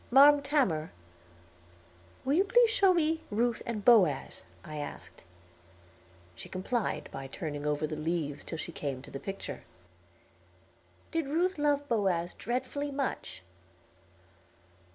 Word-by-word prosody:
"Marm 285 +3 +8
Tamor, 260 - +1 1.4
will 270 - +2
you 360 +5 +5
please 470 +3 +4
show 390 -3 +5
me 320 -2 +1
Ruth 230 +2 0
and 215 -3 -3
Boaz?" 180 - +4 0.2
I 155 0 -7
asked. 145 - -8 1.1
She - - -11
complied 205 +5 -2
by 135 0 -6
turning 145 0 -5
over 150 +1 0
the 155 - -4
leaves 155 -2 -2
till 165 - -6
she 170 - -5
came 135 -5 -4
to - - -12
the 135 - -5
picture. 195 +3 -6 1.5
"Did 330 -4 -1
Ruth 340 +4 0
love 290 -1 +1
Boaz 190 -7 +1
dreadfully 260 +4 -3
much?" 270 - -4
225 Hz, 125 wpm, -30 LUFS, -, 1.5 s, Marm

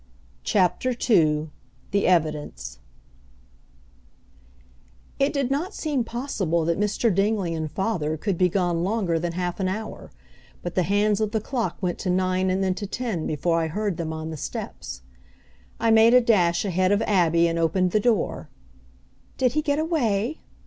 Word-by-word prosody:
CHAPTER 195 +6 +1
II 155 -6 +3 0.4
THE 200 0 +2
EVIDENCE 150 - -1 2.4
It 275 +1 +3
did 275 -3 -1
not 300 +7 -2
seem 290 -6 -1
possible 210 - -2
that 170 +2 0
Mr. 210 +1 +1
Dingley 195 -2 +1
and 160 -1 -3
father 175 -6 -1
could 195 +4 -1
be 180 +1 +3
gone 175 -2 0
longer 190 -4 0
than 170 0 -3
half 180 +1 -3
an 190 - 0
hour, 215 +4 -5 0.5
but 175 - -4
the 185 - +2
hands 205 +3 +1
of 215 0 -1
the 220 - +2
clock 235 +2 -3
went 175 -1 -1
to 185 - -3
nine 185 +1 +1
and 190 +1 0
then 190 -1 +1
to 205 +2 -5
ten 220 -7 -3
before 165 +3 0
I 160 - 0
heard 200 +2 -2
them 160 -2 -3
on 160 0 -5
the 160 - -6
steps. 65 - -6 0.8
I 230 - +2
made 225 +2 +6
a 250 - +7
dash 180 -7 +2
ahead 185 0 +1
of 205 +2 +2
Abby, 170 -5 +3
and 165 0 -1
opened 180 +3 +1
the 215 - +3
door. 220 -2 0 0.9
"Did 255 -2 +2
he 305 - +1
get 290 -1 0
away?" 280 - 0
190 Hz, 165 wpm, -24 LUFS, 170-220 Hz, 2.4 s, a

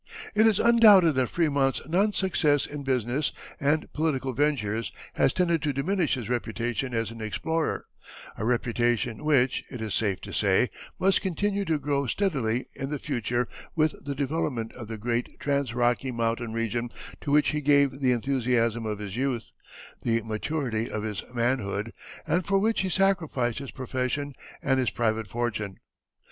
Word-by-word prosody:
It 220 +1 +5
is 215 -3 +3
undoubted 215 -8 +7
that 130 -2 +1
Frémont's 140 -6 +1
non 195 +6 +2
success 155 -8 +2
in 145 -1 -6
business 130 +1 0 0.3
and 150 +2 0
political 135 -4 0
ventures 115 -6 0 0.2
has - - +3
tended 170 -3 +1
to 150 -2 0
diminish 165 +4 +1
his 120 -4 -5
reputation 120 +1 -2
as 115 -1 -1
an 115 0 -9
explorer, 160 +9 -1 0.5
a - - -5
reputation 120 0 0
which, 135 -4 +3
it 125 - -7
is 110 -2 -3
safe 100 -4 0
to - - -8
say, 100 +4 +3 0.3
must 195 +1 +3
continue 200 +2 -1
to 160 -3 +1
grow 140 -1 -1
steadily 130 - 0
in 135 - -5
the 150 - -2
future 125 -3 -1 0.3
with 155 -1 +3
the 140 0 -3
development 135 -5 -2
of 120 -3 -8
the 110 0 -5
great 120 +2 -2
trans 140 -3 0
Rocky 120 +2 +1
Mountain 115 0 -1
region 115 +1 -1 0.3
to - - -5
which 150 +1 +4
he 150 -1 -1
gave 140 -2 +3
the 130 -2 +3
enthusiasm 120 -2 +1
of 105 -1 -2
his 100 -1 -6
youth, 130 -2 -2 0.5
the 115 -1 +1
maturity 115 +1 -2
of 105 - -3
his 105 -2 -3
manhood, 115 -3 -1 0.3
and 180 +2 +1
for 195 -1 +3
which 220 +2 +2
he 190 - -1
sacrificed 160 - +1
his 140 - -7
profession 130 +2 -3 0.3
and 135 -1 +2
his 125 -4 +2
private 110 -2 0
fortune. 110 -3 -3
130 Hz, 165 wpm, -27 LUFS, 115-150 Hz, 0.5 s, undoubted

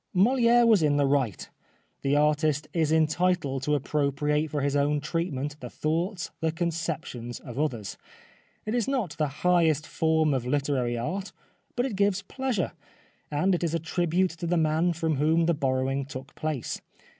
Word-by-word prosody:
Moliere 240 +4 +5
was 220 -5 +5
in 145 -2 +3
the 145 - +3
right. 135 -8 0 0.5
The 140 +1 +1
artist 150 0 +2
is 160 -3 +1
entitled 160 -3 +1
to 150 +2 +1
appropriate 150 +2 0
for 145 -1 -2
his 140 0 0
own 145 +1 +2
treatment 150 -2 -3
the 125 - -7
thoughts, 170 - -2
the 160 0 0
conceptions 160 -8 -3
of 125 0 -7
others. 120 -10 -2 0.7
It 215 - -2
is 240 -3 0
not 255 - -1
the 150 - +2 0.2
highest 165 -4 +3
form 160 0 +1
of 130 -3 0
literary 130 -3 0
art, 190 +12 -3 0.4
but 245 - +1
it 250 -6 -3
gives 200 0 +1
pleasure, 245 - -2 0.6
and 155 +6 +1
it 175 - 0
is 165 -1 0
a - - 0
tribute 175 +3 0
to 170 +1 -6
the 175 +1 +2
man 160 +2 +2
from 160 -2 -1
whom 160 +3 +3
the 170 - +3
borrowing 135 -1 0
took 135 +1 -9
place. 155 -5 -3
155 Hz, 165 wpm, -27 LUFS, 140-175 Hz, 0.7 s, Moliere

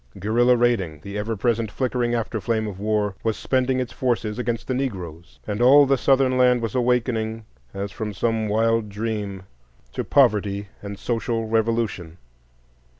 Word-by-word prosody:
Guerrilla 120 +5 +3
raiding, 100 -11 +1
the 100 0 -7
ever 105 +2 -2
present 115 0 0
flickering 120 +1 -1
after 115 -1 -2
flame 110 +2 0
of 100 -3 -6
war, 105 -1 0
was 110 -1 0
spending 130 0 0
its 125 -2 -3
forces 120 -4 -1
against 120 -2 -2
the 130 - -1
Negroes, 90 - -5
and 105 +2 -3
all 140 +4 +7
the 135 0 +3
Southern 130 0 +2
land 125 -1 +5
was 115 -3 -3
awakening 115 -3 0 0.3
as 100 +1 -5
from 110 -3 -4
some 110 +2 -1
wild 115 +1 +1
dream 105 -2 -4 0.5
to - - -2
poverty 105 -7 +2
and 100 0 -7
social 115 +1 -2
revolution. 110 -7 -1
115 Hz, 155 wpm, -23 LUFS, 105-120 Hz, 0.5 s, all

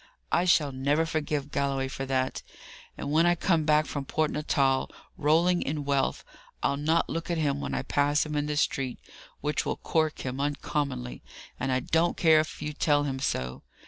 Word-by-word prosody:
I 175 - +3
shall 155 -5 +4
never 140 +5 +1
forgive 150 -2 -2
Galloway 140 -1 0
for 135 0 -5
that! 130 -1 -1 0.6
and 140 - -4
when 165 +3 +4
I 175 - +4
come 165 -2 +1
back 155 0 +4
from 145 -1 -4
Port 155 +3 0
Natal, 140 -3 +1 0.3
rolling 170 +4 +3
in 145 0 -3
wealth, 140 -1 0 0.4
I'll - - +2
not 155 +4 +1
look 165 +1 -4
at 170 - 0
him 145 -3 0
when - - -3
I - - -1
pass 145 +2 +2
him 150 -1 -4
in 145 0 0
the 150 0 -2
street, 135 -3 0 0.4
which 150 +1 0
will - - -2
cork 155 -2 0
him 130 +1 -3
uncommonly, 140 - -2 0.4
and 135 +1 -1
I 130 0 +1
don't 165 +6 +1
care 160 -2 +6
if 155 -1 -3
you 150 0 -3
tell 145 -1 +2
him 135 -2 -2
so. 65 - -2
145 Hz, 190 wpm, -28 LUFS, 135-155 Hz, 0.6 s, care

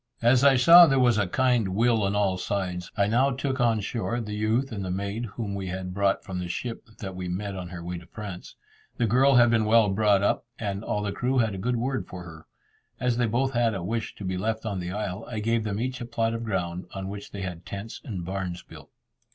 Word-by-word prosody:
As 120 +2 +5
I 140 -1 +7
saw 170 +7 +9
there 135 -2 +2
was 120 -4 +4
a 100 - +1
kind 120 -3 +1
will 115 0 +3
on 100 0 0
all 100 -2 +2
sides, 90 -2 -3
I 100 - +4
now 120 +6 +3
took 135 0 -2
on 115 -3 +2
shore 115 +3 -2
the 105 -3 -5
youth 110 +5 0
and 100 -3 -4
the 95 - -4
maid 100 +5 -3
whom 105 -1 -5
we 95 -1 -4
had 90 0 -4
brought 100 0 +1
from 95 -3 -5
the 90 - -3
ship 115 +7 -5
that 95 -4 -6
we 90 0 -5
met 100 +2 -3
on 90 -1 -5
her 85 -1 -7
way 90 0 -4
to 85 - -16
France. 105 -5 -8 0.4
The 120 - +2
girl 130 +5 +4
had 120 -1 +6
been 115 -2 +3
well 110 -1 +5
brought 100 0 +3
up, 100 - +1
and 100 -1 -3
all 105 -1 -2
the 100 - -1
crew 125 +5 -1
had 110 -4 +2
a 95 - -5
good 120 +5 0
word 130 +3 -2
for 90 -1 -8
her. 80 -2 -12 0.5
As 125 -1 +1
they 120 -1 +2
both 130 +4 +1
had 115 -3 +2
a 95 - -4
wish 110 +4 -3
to - - -9
be 95 0 -2
left 110 +2 -2
on 100 -4 -2
the 90 0 -4
isle, 100 0 -4
I 115 - -5
gave 115 +1 0
them 105 -1 -2
each 130 +2 -3
a - - -3
plot 115 -1 -1
of 115 0 -3
ground, 90 -4 -3
on 95 -1 -4
which 100 +1 -7
they 100 - -7
had 90 -2 -6
tents 100 +3 -7
and 95 -9 -5
barns 95 -1 -4
built. - - -14
105 Hz, 250 wpm, -26 LUFS, 95-120 Hz, 0.5 s, saw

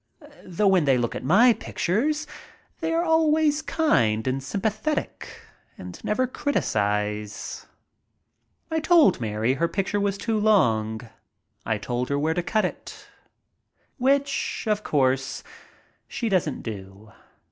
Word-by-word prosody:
Though 190 +3 +1
when 185 -5 +3
they 135 -2 +4
look 120 -1 -1
at - - -6
my 220 - +5
pictures 290 - -1 0.5
they 325 -1 -2
are 330 +1 +1
always 315 -2 +2
kind 120 - +1
and 130 +1 -1
sympathetic 215 - -3 0.4
and 90 -1 -10
never 255 +5 +1
criticize. 105 - -2 1.0
I 320 - +1
told 310 - +4
Mary 110 +2 0
her 165 +5 0
picture 200 +3 -1
was 200 -1 0
too 220 +1 -1
long. 110 - +2 0.7
I 110 - +1
told 120 +4 -3
her 140 - 0
where 155 +3 0
to 175 - -1
cut 215 +5 0
it. - - -8 0.9
Which, 275 +2 0
of 210 -1 0
course, 135 -2 0 0.6
she 230 - -3
doesn't 185 -4 0
do. 100 -1 -9
185 Hz, 125 wpm, -24 LUFS, -, 1.0 s, my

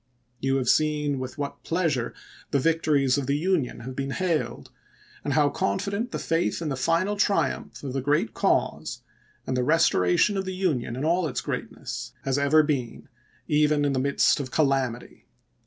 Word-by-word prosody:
You 135 0 +1
have 130 -2 -1
seen 150 -2 +2
with 130 +2 -6
what 145 -1 -5
pleasure 160 -8 -1 0.3
the - - +1
victories 145 -3 +2
of 135 - -4
the 140 +1 +1
Union 160 -8 0
have 130 +3 -7
been 135 0 -3
hailed, 170 +2 -2 0.5
and 145 - -1
how 150 -2 +4
confident 200 - -1
the - - -4
faith 165 +1 0
in 165 -2 -3
the 135 - -1
final 165 +9 +1
triumph 200 -6 0
of 135 -3 -4
the 135 - -1
great 145 +3 +1
cause - - 0 0.4
and 130 - -2
the 125 - +1
restoration 160 - +3
of 190 - -2
the 185 0 -4
Union 150 -11 -1
in 135 +4 -3
all 170 +1 +2
its 125 -4 -3
greatness 125 -3 -5
has 135 +1 0
ever 150 +2 +5
been, 135 -6 -3 0.4
even 150 0 +3
in 140 - +1
the 130 - 0
midst 140 +2 +3
of 135 -2 -4
calamity." 135 -5 -1
145 Hz, 175 wpm, -26 LUFS, 130-165 Hz, 0.5 s, ever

